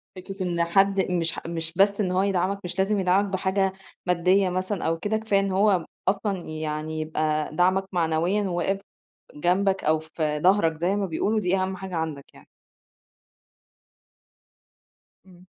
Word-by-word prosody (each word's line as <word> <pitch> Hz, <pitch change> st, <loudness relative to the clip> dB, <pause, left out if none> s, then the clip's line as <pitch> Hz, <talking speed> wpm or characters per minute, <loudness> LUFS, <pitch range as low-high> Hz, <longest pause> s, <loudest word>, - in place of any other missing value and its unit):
فكرة 190 Hz, +1 st, -6 dB
إن 170 Hz, -2 st, 0 dB
حد 195 Hz, +2 st, +2 dB
مش 165 Hz, -2 st, -1 dB
مش 165 Hz, -1 st, -4 dB
بس 200 Hz, +1 st, +4 dB
إن 185 Hz, -3 st, 0 dB
هو 185 Hz, +1 st, +2 dB
يدعمك، 195 Hz, 0 st, 0 dB
مش 180 Hz, +1 st, -5 dB
لازم 200 Hz, +2 st, +2 dB
يدعمك 190 Hz, +2 st, +3 dB
بحاجة 190 Hz, 0 st, 0 dB, 0.3 s
مادية 180 Hz, +2 st, +3 dB
مثلًا 185 Hz, +2 st, -2 dB
أو 165 Hz, 0 st, +1 dB
كده 210 Hz, +5 st, 0 dB
كفاية 215 Hz, -2 st, +1 dB
إن 195 Hz, 0 st, -1 dB
هو 190 Hz, -2 st, +3 dB, 0.2 s
أصلًا 195 Hz, -1 st, 0 dB
يعني 155 Hz, 0 st, -4 dB
يبقى 155 Hz, -1 st, -1 dB
دعمك 185 Hz, +3 st, +3 dB
معنويًا، 170 Hz, +3 st, +1 dB
وواقف 190 Hz, +1 st, -1 dB, 0.6 s
جنبك 190 Hz, +5 st, +1 dB
أو 155 Hz, +1 st, +3 dB
في 155 Hz, -1 st, -3 dB
ضهرك 165 Hz, -2 st, +3 dB
زي 185 Hz, +4 st, +1 dB
ما 205 Hz, -1 st, 0 dB
بيقولوا، 205 Hz, +6 st, 0 dB
دي 185 Hz, -1 st, +1 dB
أهم 190 Hz, 0 st, -1 dB
حاجة 185 Hz, -1 st, -6 dB
عندك 160 Hz, -4 st, -3 dB
يعني. -, -, -17 dB, 2.8 s
إمم. 180 Hz, -1 st, -18 dB
185 Hz, 150 wpm, -25 LUFS, 165-195 Hz, 2.8 s, بس